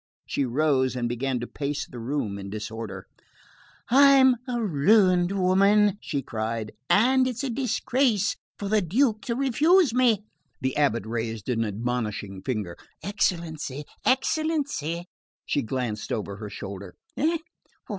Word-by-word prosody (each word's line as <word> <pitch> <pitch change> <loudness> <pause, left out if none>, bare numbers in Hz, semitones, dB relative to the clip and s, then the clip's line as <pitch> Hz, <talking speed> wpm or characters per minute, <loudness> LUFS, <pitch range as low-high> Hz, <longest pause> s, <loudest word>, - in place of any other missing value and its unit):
She 140 - -1
rose 130 0 +1
and 120 -1 -1
began 125 +2 -1
to - - -3
pace 145 0 -3
the 125 - -10
room 115 -5 -3
in 100 0 -7
disorder. 110 +1 -6 0.9
"I'm 270 -1 +7
a 245 -1 -1
ruined 185 0 +3
woman," 200 +2 +3
she 140 -3 -3
cried, 110 -1 -3 0.2
"and 255 +4 +4
it's 250 0 -3
a 270 - -1
disgrace 250 -2 +1 0.2
for 200 - -4
the 215 +1 +2
Duke 215 - +1
to 235 - 0
refuse 290 - +3
me." 235 -5 +3 0.3
The 130 0 -1
abate 135 -7 +1
raised 115 -1 -4
an 115 -2 +1
admonishing 105 -3 -3
finger. 105 -9 -3 0.3
"Excellency...excellency..." 175 - -1 0.4
She 145 - 0
glanced 115 -3 -3
over 100 -3 -3
her 105 -1 -7
shoulder. 100 -2 -8 0.2
"Eh? 325 +4 +1
150 Hz, 130 wpm, -26 LUFS, -, 0.9 s, I'm